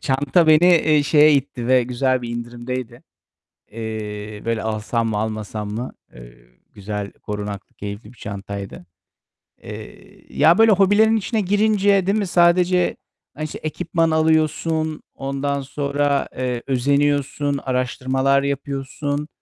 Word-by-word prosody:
Çanta 145 +5 +2
beni, 155 +2 +6
eee, 155 -2 +3
şeye 150 +1 +5
itti 130 -3 -2
ve 130 0 +4
güzel 125 +1 0
bir 120 - -5
indirimdeydi. 120 +1 -6 0.7
Eee, 105 -1 -6
böyle, 115 -1 -1
alsam 110 +1 -1
mı, 105 - -1
almasam 110 -1 -4
mı? 120 +4 -4 0.2
Eee, - - -13 0.4
güzel, 100 0 -5
korunaklı, 105 -1 -7
keyifli 105 +3 -8
bir - - -24
çantaydı. 100 -2 -7 0.8
Eee, - - -12
ya 160 +5 +6
böyle 225 0 +6
hobilerin 205 +3 +4
içine 220 +1 -1
girince 205 -1 +2
değil 200 +2 +2
mi, 205 -3 -1
sadece, 180 +1 +3 0.4
hani, 155 - -4
işte, 155 - -7
ekipman 165 +1 0
alıyorsun, 160 0 +1
ondan 140 +1 -2
sonra, 140 +1 -1
eee, 125 -2 -2
özeniyorsun, 140 +1 +1
araştırmalar 130 +1 0
yapıyorsun. 140 +1 -3
135 Hz, 125 wpm, -21 LUFS, 115-155 Hz, 0.8 s, beni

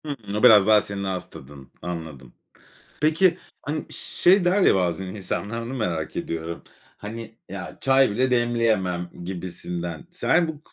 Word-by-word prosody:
Hımm, 115 -9 -5
o 105 - -1
biraz 105 -5 +8
daha 105 -1 +6
senin 100 -1 -5
ağız 95 -1 -3
tadın. 70 0 -13
Anladım. 80 -8 -7 0.7
Peki, 160 +4 +4 0.2
hani, 150 +1 -3
şey 185 +1 +2
der 185 +3 +3
ya - - +5
bazen 90 0 0
insanlar 105 +3 -4
onu 120 +3 -6
merak 85 -11 -2
ediyorum. 85 0 -4 0.3
"Hani, 115 +2 -8
ya 95 0 -7
çay 135 -2 +4
bile 130 +5 +1
demleyemem." 110 -8 +1
gibisinden. 90 - -5
Sen 175 -1 +2
bu 155 -2 -7
105 Hz, 145 wpm, -24 LUFS, 90-130 Hz, 0.7 s, biraz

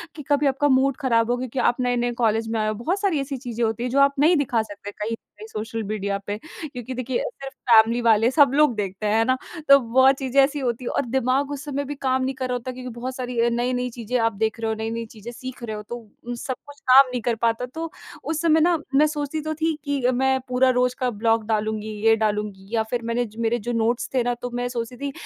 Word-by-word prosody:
कि 295 - -8
कभी 290 0 +3
आपका 275 +2 +2
मूड 265 +1 +3
खराब 235 -3 +2
हो 245 - +1
क्योंकि 255 0 -4
आप 245 - +2
नए 245 0 +1
नए 240 0 0
कॉलेज 225 0 +2
में 225 -1 -1
आए 215 - 0
हो। 215 - 0
बहुत 330 - -2
सारी 375 -7 +1
ऐसी 275 0 -4
चीज़ें 240 -2 -4
होती 225 +2 -2
हैं 250 - -1
जो 275 +3 +1
आप 280 0 +5
नहीं 320 +5 +5
दिखा 255 -5 +1
सकते 205 -1 -8
कहीं 210 +2 -5
न - - 0 0.2
कहीं 435 - -9
सोशल 225 - -4
मीडिया 200 -2 -1
पे 205 +1 -2
क्योंकि 260 -7 -7
देखिए 255 0 -2
सिर्फ़ 275 - -7 0.2
फैमिली 230 +1 +6
वाले 225 0 +4
सब 280 -2 +5
लोग 295 -4 +4
देखते 200 0 -4
हैं, 215 +2 +2
है 225 - +4
ना? 255 +1 +2 0.3
तो 275 - +10
बहुत 260 +3 +4
चीज़ें 270 0 +3
ऐसी 290 +1 0
होती 245 -1 -2
है - - -2
और 280 - 0
दिमाग 265 +3 0
उस 285 -1 -5
समय 285 0 -2
भी 290 +1 -5
काम 260 -1 0
नहीं 265 +1 -2
कर 260 0 -3
रहा - - 0
होता 245 +1 -3
क्योंकि 250 0 -7
बहुत 255 +1 -4
सारी 250 -2 -4
अ, 235 - +3
नई-नई 250 +1 -1
चीज़ें 240 +1 -3
आप 225 -1 +2
देख 220 +2 -1
रहे 225 - -1
हो, - - -1
नई-नई 225 +1 -3
चीज़ें 225 +1 -10
सीख 255 0 -9
रहे 220 -2 -4
हो 210 - -7
तो 240 +1 -8
सब 255 +2 -4
कुछ 285 0 -13
काम 260 0 +6
नहीं 245 -2 -2
कर 235 +1 0
पाता 230 +2 +1
तो 325 0 -3 0.3
उस 315 -1 -2
समय 320 -1 +4
ना 340 0 +4 0.2
मैं 300 +2 +6
सोचती 300 0 -3
तो 310 +1 -3
थी 320 0 +1
कि 285 -2 -1
अ, 255 - +4
मैं 265 +1 +2
पूरा 255 +1 +3
रोज़ 250 0 +2
का 255 -1 +1
ब्लॉग 225 0 +1
डालूँगी 215 -1 -1 0.2
ये 225 - +7
डालूँगी 205 -2 -3
या 220 - +2
फिर 245 -1 0
मैंने 230 +1 0
मेरे 230 +1 +1
जो 240 +4 -4
नोट्स 230 +2 0
थे 255 -2 +2
ना 245 0 0
तो 245 - -3
मैं 245 0 -1
सोचती 240 0 -5
थी 280 +2 -4
245 Hz, 260 wpm, -23 LUFS, 225-270 Hz, 0.3 s, तो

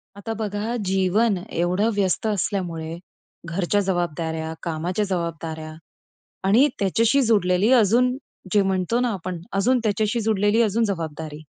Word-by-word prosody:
आता 215 +3 -5
बघा. 215 +1 -3
जीवन 195 +3 +2
एवढं 180 +6 +1
व्यस्त 200 +1 0
असल्यामुळे 170 -5 -2 0.5
घरच्या 185 +4 0
जबाबदाऱ्या, 165 -4 -2
कामाच्या 175 +5 -1
जबाबदाऱ्या 165 -4 -4 0.7
आणि 235 +9 +5
त्याच्याशी 230 +7 +3
जुडलेली 205 -3 +3
अजून 250 +2 +4 0.4
जे 205 - +5
म्हणतो 190 +4 0
ना 250 0 +1
आपण 185 -2 -5
अजून 245 +6 +2
त्याच्याशी 215 +2 0
जुडलेली 210 +1 +2
अजून 225 +1 +2
जबाबदारी. 160 -5 -4
195 Hz, 120 wpm, -23 LUFS, 170-220 Hz, 0.7 s, आणि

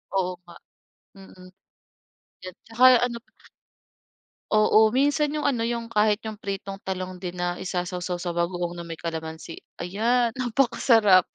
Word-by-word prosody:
Oo 185 -1 +1
nga, 175 -1 -15 0.6
mm. 185 -1 -15 0.9
'Yan 185 -1 -8
tsaka 230 +3 -2 0.2
ano 235 -2 -5 1.3
Oo, 215 0 +5
minsan 290 +3 +2
'yong 300 -1 -1
ano 245 -5 0
'yong 235 0 -2
kahit 215 -1 +2
'yong 215 - -5
pritong 195 -1 -5
talong 185 -1 -4
din 180 0 -5
na 175 0 -1
isasawsaw 180 -1 -4
sa 175 -1 -4
bagoong 175 0 -2
na 170 - -7
may 165 -1 -8
kalamansi, 160 0 -6 0.2
ayan 230 +6 0
napakasarap. 235 -6 +3
195 Hz, 130 wpm, -25 LUFS, 180-230 Hz, 1.3 s, Oo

